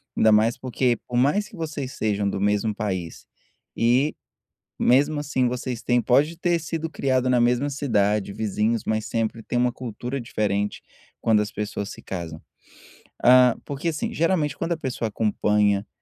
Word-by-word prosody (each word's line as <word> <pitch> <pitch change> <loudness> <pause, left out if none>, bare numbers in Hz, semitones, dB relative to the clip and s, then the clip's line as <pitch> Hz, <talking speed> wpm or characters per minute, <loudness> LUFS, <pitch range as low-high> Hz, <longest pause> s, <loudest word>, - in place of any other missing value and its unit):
ainda 110 0 +4
mais 110 +2 +4
porque 125 -1 0
por 120 - -2
mais 150 +11 +2
que - - -13
vocês 150 -5 -4
sejam 105 -2 0
do 100 - -3
mesmo 105 +2 +1
país, 95 -6 -4 0.5
e 125 +6 +2 0.6
mesmo 145 +4 +3
assim 135 -3 0
vocês 125 -1 -4
tem 120 0 +2
podem 145 +7 +3
ter 175 -1 +2
sido 165 +1 -4
criados 130 -3 0
na 125 - +3
mesma 125 +4 +2
cidade, 105 -7 0
vizinhos, 110 +2 -1
mas 110 -1 0
sempre 115 0 -2
tem 120 - -2
uma 125 0 +2
cultura 125 +2 -5
diferente 105 -3 -2 0.4
quando 110 -2 +3
as 105 - -4
pessoas 105 -1 -4
se - - -10
casam. 85 -4 -6 0.8
Hã, 125 -1 +7
porque 145 +4 -4
assim 160 -2 -2
geralmente 165 -2 +1
quando 170 0 -2
a - - 0
pessoa 130 -6 -3
acompanha 105 -1 +1
120 Hz, 160 wpm, -24 LUFS, 105-140 Hz, 0.8 s, Hã